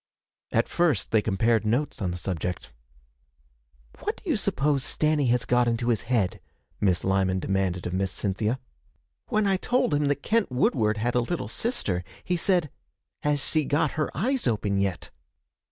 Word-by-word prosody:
At - - +2
first 155 - +1
they 110 - +4
compared 110 +2 +2
notes 120 +6 -1
on 95 - 0
the 90 - -3
subject. 90 0 -4 1.3
'What - - -3
do - - -15
you - - +3
suppose 140 -1 +1
Stanny 150 -2 +1
has 125 0 +2
got 125 0 +3
into 120 +1 0
his 115 - +2
head?' 110 -8 +1 0.4
Miss 90 -4 +2
Lyman 95 -1 +1
demanded 95 -2 -1
of 90 - -3
Miss 95 0 0
Cynthia. 105 +5 -1 0.7
'When 215 -1 +1
I 195 -1 +3
told 245 -4 +1
him 145 0 +2
that 145 0 -1
Kent 225 - +1
Woodward 110 -4 +2
had 120 +3 0
a 125 - +3
little 120 - -3
sister, 110 - -1 0.2
he 180 - 0
said, 175 -4 +1 0.5
"Has 150 -1 +1
s'e 155 - +2
got 145 +1 +2
her 155 -2 -1
eyes 255 - 0
open 100 -4 0
yet?" 95 -3 -2
120 Hz, 170 wpm, -26 LUFS, 100-150 Hz, 1.3 s, they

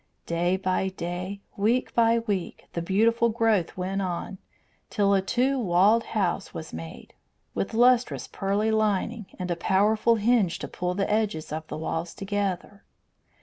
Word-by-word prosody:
Day 175 +2 +1
by 190 0 0
day, 185 +2 -5
week 230 +5 +1
by 230 0 +4
week, 205 -6 -3
the 170 - -2
beautiful 225 +6 +2
growth 220 -7 +1
went 190 +2 -2
on, 185 +1 -4 0.5
till 200 -2 +2
a 195 - +3
two 255 +7 +1
walled 205 +2 +3
house 195 -1 -1
was 160 - -7
made, 80 0 -9 0.4
with 220 - -3
lustrous 245 +1 +3
pearly 205 +2 0
lining 215 0 0
and 180 -1 -3
a - - +1
powerful 215 +6 +3
hinge 215 -5 +2
to - - -6
pull 180 0 -3
the 195 0 0
edges 205 -8 -1
of 155 +1 -4
the - - -5
walls 165 +2 -3
together. 200 0 -3
200 Hz, 150 wpm, -26 LUFS, 180-220 Hz, 0.5 s, by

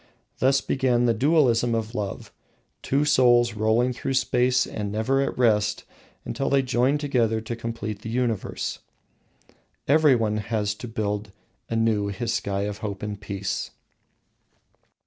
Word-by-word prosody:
Thus 135 +1 +3
began 125 -2 +1
the 120 - +3
dualism 120 -3 +3
of 110 0 -3
love 105 -4 -5 0.5
two 140 +2 +1
souls 120 -4 +4
rolling 110 +4 +1
through 135 +2 -3
space 125 0 +2
and 105 -2 -5
never 110 +6 +1
at 140 - -2
rest 105 -3 +2 0.4
until 135 - -2
they 135 -1 +3
join 130 +2 +2
together 120 -7 +1
to 115 +1 -5
complete 115 -3 -5
the 115 - -6
universe. 115 -3 -2 1.1
Everyone 130 -8 +3
has 105 -1 -1
to 120 - -9
build 105 -2 -3 0.4
anew 115 -2 +1
his 100 +4 -3
sky 100 -2 -2
of 105 0 -4
hope 105 -3 -5
and 105 -1 -5
peace. 100 -1 -3
115 Hz, 135 wpm, -25 LUFS, 105-125 Hz, 1.1 s, souls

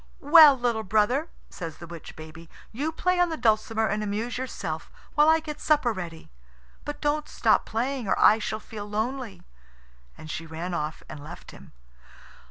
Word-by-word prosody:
"Well, 295 -1 +9
little 240 -3 0
brother," 220 - +1 0.2
says 165 -4 -7
the 170 - -10
witch 170 -1 -10
baby, 160 +1 -11 0.2
"you 290 +8 -2
play 360 +3 0
on 355 -1 +3
the 320 - -3
dulcimer 220 -1 +1
and 210 0 -1
amuse 210 +3 -3
yourself 185 -11 -5 0.2
while 300 +1 +5
I 320 0 +5
get 300 -2 -8
supper 290 -6 +2
ready. 170 -4 -8 0.5
But 295 0 -6
don't 300 0 -1
stop - - +2
playing, 245 +1 -2
or - - +1
I 215 - +6
shall 215 0 -3
feel 210 -1 -8
lonely." 230 +2 -3 0.7
And 155 - -10
she 165 - -5
ran 165 +3 -5
off 155 -2 -3
and 145 - -9
left 165 +4 -10
him. - - -15
220 Hz, 175 wpm, -26 LUFS, 175-290 Hz, 0.7 s, Well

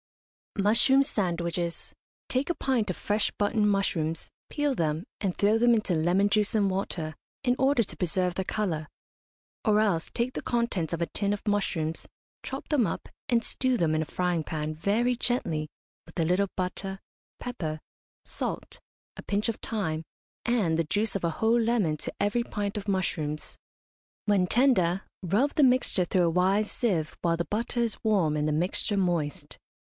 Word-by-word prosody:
MUSHROOM 230 +7 +5
SANDWICHES. 170 - -2 0.3
Take 260 +4 -1
a 345 - +1
pint 245 -6 0
of 185 - -2
fresh 210 +1 0
button 210 +1 +2
mushrooms, 165 -6 0 0.2
peel 290 -2 0
them, 160 0 -1 0.2
and 195 -4 -1
throw 210 +2 +4
them 240 +1 +5
into 215 -5 +1
lemon 175 +5 +3
juice 210 0 +2
and 205 -2 +3
water, 175 -5 -3 0.3
in 245 0 +3
order 265 -2 +3
to - - -7
preserve 180 0 0
their 190 - -1
colour; 170 -9 -1 0.8
or 210 -2 +4
else 195 -7 +1
take 240 +2 -1
the - - -4
contents 235 -9 0
of 170 0 -2
a - - +3
tin 200 +3 -1
of 205 - -6
mushrooms, 165 -6 0 0.4
chop 270 +1 -5
them 285 -7 +3
up 170 - -3 0.2
and 235 -1 +3
stew 255 -1 +1
them 160 -5 +2
in 155 - +1
a - - -1
frying 175 -1 -1
pan 155 0 -3
very 215 +10 +1
gently 170 -12 -1 0.4
with 160 - -8
a 165 - +3
little 185 +4 +2
butter, 190 +1 -3 0.4
pepper, 165 -11 -4 0.5
salt, - - -4 0.4
a - - -8
pinch 205 +2 0
of 225 - -1
thyme, 165 -8 -2 0.4
and 210 -10 +2
the 165 - +2
juice 205 +6 0
of 195 - -2
a 170 - +2
whole 225 +2 +4
lemon 225 -9 +2
to - - -4
every 205 +4 +1
pint 205 -3 -3
of 210 0 -4
mushrooms. 155 -6 -1 0.7
When 200 -3 +3
tender, 195 -7 +3 0.2
rub 210 - +2
the 305 - +4
mixture 250 -8 +3
through 180 +1 +2
a - - +3
wise 190 +5 +2
sieve 175 -10 0
while 165 -1 +1
the 170 - -1
butter 230 +7 -2
is 235 -2 -1
warm 190 -9 +2
and 150 0 0
the - - +1
mixture 180 +5 0
moist. 170 -6 -1
195 Hz, 175 wpm, -28 LUFS, 170-225 Hz, 0.8 s, MUSHROOM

